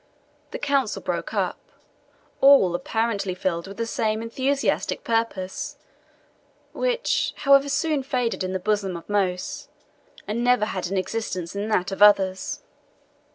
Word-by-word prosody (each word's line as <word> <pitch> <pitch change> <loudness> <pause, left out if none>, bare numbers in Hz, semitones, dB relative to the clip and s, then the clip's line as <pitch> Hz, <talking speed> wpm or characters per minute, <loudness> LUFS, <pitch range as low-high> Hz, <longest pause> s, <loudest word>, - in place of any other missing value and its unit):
The - - -5
Council 275 -6 0
broke - - -3
up, - - -1 0.8
all 270 -10 +6
apparently 200 0 -1
filled 170 -2 -2
with 195 +1 -10
the 230 - -1
same 220 -1 -1
enthusiastic 265 +4 -1
purpose 230 +5 -2 1.0
which, - - 0
however, 275 0 +4
soon 305 0 +1
faded 250 -6 -1
in 185 - -2
the 190 - -1
bosom 195 -2 -1
of 170 - -12
most, 190 -3 -2 0.6
and 230 +3 -2
never 245 -3 +3
had 185 -4 -3
an 195 +2 -2
existence 185 -3 -3
in 200 +1 -2
that 190 -3 +1
of 195 - -5
others. 205 +8 +4
215 Hz, 135 wpm, -24 LUFS, 190-270 Hz, 1.0 s, all